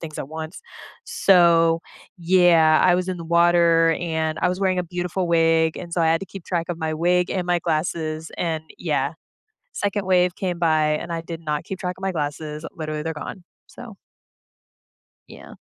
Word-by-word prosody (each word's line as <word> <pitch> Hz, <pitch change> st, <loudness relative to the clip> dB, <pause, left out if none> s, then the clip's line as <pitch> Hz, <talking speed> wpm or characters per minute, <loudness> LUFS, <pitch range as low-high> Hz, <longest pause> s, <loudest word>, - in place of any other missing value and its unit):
things 155 Hz, -2 st, -8 dB
at 135 Hz, -, -5 dB
once. 160 Hz, +2 st, -7 dB, 0.4 s
So, 170 Hz, -3 st, +4 dB, 0.4 s
yeah, 170 Hz, -3 st, +4 dB
I 180 Hz, -, +5 dB
was 180 Hz, +1 st, -1 dB
in 185 Hz, -, -2 dB
the 170 Hz, -, -7 dB
water, 170 Hz, -1 st, +4 dB
and 160 Hz, -2 st, -2 dB
I -, -, +2 dB
was 180 Hz, +2 st, -3 dB
wearing 185 Hz, -2 st, +1 dB
a 180 Hz, -, -1 dB
beautiful 180 Hz, +1 st, -3 dB
wig, 165 Hz, -1 st, +3 dB
and 175 Hz, -1 st, -8 dB
so 170 Hz, -, 0 dB
I 165 Hz, -, +3 dB
had 165 Hz, +1 st, +2 dB
to 195 Hz, -, -7 dB
keep 190 Hz, -1 st, -10 dB
track 170 Hz, -2 st, -2 dB
of 175 Hz, -2 st, -4 dB
my 160 Hz, -1 st, -2 dB
wig 175 Hz, +2 st, +1 dB
and 185 Hz, -2 st, -1 dB
my 175 Hz, -1 st, +2 dB
glasses 160 Hz, -1 st, -2 dB
and, 160 Hz, -2 st, -2 dB, 0.2 s
yeah. 145 Hz, -4 st, -1 dB, 0.6 s
Second 205 Hz, -, -2 dB
wave 180 Hz, -1 st, +3 dB
came 180 Hz, -3 st, -3 dB
by, 155 Hz, -2 st, +2 dB
and 170 Hz, -, -6 dB
I 165 Hz, -, -2 dB
did 165 Hz, 0 st, -7 dB
not 150 Hz, -2 st, -3 dB
keep 190 Hz, -, -6 dB
track 180 Hz, -1 st, -4 dB
of -, -, -14 dB
my 195 Hz, -, 0 dB
glasses, 150 Hz, 0 st, -4 dB
literally, 155 Hz, -1 st, -4 dB
they're 160 Hz, +1 st, -3 dB
gone. 175 Hz, +3 st, -8 dB, 0.2 s
So 230 Hz, -4 st, -12 dB, 1.3 s
Yeah. -, -, -13 dB
170 Hz, 190 wpm, -22 LUFS, 160-180 Hz, 1.3 s, I